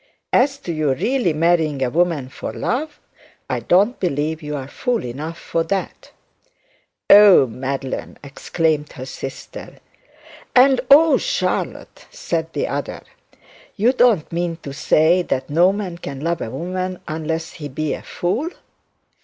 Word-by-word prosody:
As 275 +2 +3
to 175 -11 -5
your 150 -4 0
really 245 - 0
marrying 155 -3 +1
a 125 - -1
woman 165 -5 +1
for - - -6
love, 295 +5 -3 0.5
I - - -1
don't 200 +8 +2
believe 160 -2 -1
you 150 -1 -5
are 135 -2 -5
fool 245 - -2
enough 150 +7 -6
for 165 - -2
that.' 195 +2 -4 1.0
'Oh, 200 -8 +8
Madeline!' 130 +2 -5 0.3
cried 155 -3 +1
her 130 - -8
sister. 135 0 -8 0.8
'And 260 0 +6
oh, 310 +3 +7
Charlotte!' - - -3
said - - -3
the - - -1
other. - - -4 0.7
'You 235 +5 +3
don't 235 - +3
mean 170 0 -1
to 140 - -6
say 160 +5 +3
that 135 -5 -3
no 175 +5 +5
man 195 -4 -5
can 140 -5 -7
love 170 +2 -1
a - - -3
woman 185 +7 -4
unless 160 +1 -3
he 150 -3 -7
is 150 +2 -3
a - - -14
fool?' 215 - -2
165 Hz, 145 wpm, -20 LUFS, 145-195 Hz, 1.0 s, Oh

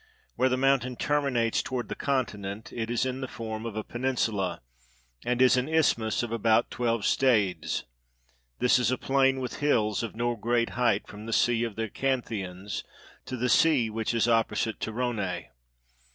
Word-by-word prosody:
Where 130 - +2
the 130 - +1
mountain 130 -1 +2
termi 145 +1 0
nates 115 -2 +1
toward 125 -2 -3
the - - -4
continent, 110 -6 -3
it 115 -1 -3
is 120 +1 +1
in 130 +1 -3
the 130 - -3
form 110 -1 -5
of 110 - -6
a 110 - -2
penin 130 +3 -2
sula, 100 -6 -1 0.6
and 125 0 0
is 130 0 +5
an 125 +4 0
isthmus 120 -9 +2
of 120 - -4
about 115 0 +2
twelve 115 -2 0
stades: 110 -9 +2 0.7
this 125 0 +4
is 120 -3 +2
a 130 - 0
plain 135 0 +2
with 125 -1 -4
hills 110 -8 +2
of 115 -3 -5
no 120 +1 0
great 115 +1 0
height 115 -4 +1
from 105 +2 -10
the 115 - -2
sea 120 0 +3
of 115 -3 -3
the 115 - -2
Acanthians 105 -7 -3 0.4
to 130 - -5
the 125 +1 0
sea 125 -4 +4
which 110 +1 -2
is 115 0 +2
opposite 115 -1 +1
Torone. 110 -5 -2
120 Hz, 180 wpm, -28 LUFS, 110-130 Hz, 0.7 s, is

